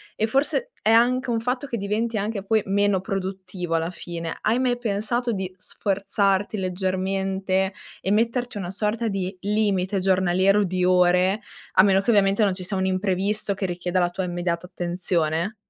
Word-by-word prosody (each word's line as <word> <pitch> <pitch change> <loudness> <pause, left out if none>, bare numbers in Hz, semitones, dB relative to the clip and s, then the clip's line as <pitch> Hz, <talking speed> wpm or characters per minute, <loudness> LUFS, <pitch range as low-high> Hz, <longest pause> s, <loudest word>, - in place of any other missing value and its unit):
e 220 - 0
forse 290 - 0
è 220 - +3
anche 245 +2 +3
un 230 - +1
fatto 250 +4 -2
che 255 -4 -3
diventi 215 +3 -1
anche 205 -1 -3
poi 220 +1 +2
meno 200 -1 +2
produttivo 190 -3 -4
alla 165 0 0
fine. 170 -2 -6
Hai 230 +4 +1
mai 250 -1 +1
pensato 235 +2 -1
di 190 -3 -3
sforzarti 200 +1 0
leggermente 190 +1 -1 0.3
e 190 - -1
metterti 235 +2 0
una 185 -3 -4
sorta 215 +4 -1
di 195 -2 -3
limite 200 -2 0
giornaliero 190 +2 +3
di 185 -1 -1
ore, 180 +3 +3 0.3
a 185 - +7
meno 195 -1 +4
che 235 - +1
ovviamente 200 0 +3
non 195 -2 +2
ci 185 - -7
sia 190 +2 -1
un 190 - 0
imprevisto 195 +2 0
che 195 - -3
richieda 180 0 -1
la 175 0 +2
tua 190 +1 -3
immediata 175 0 -2
attenzione? 175 +1 -1
195 Hz, 170 wpm, -24 LUFS, 185-215 Hz, 0.3 s, a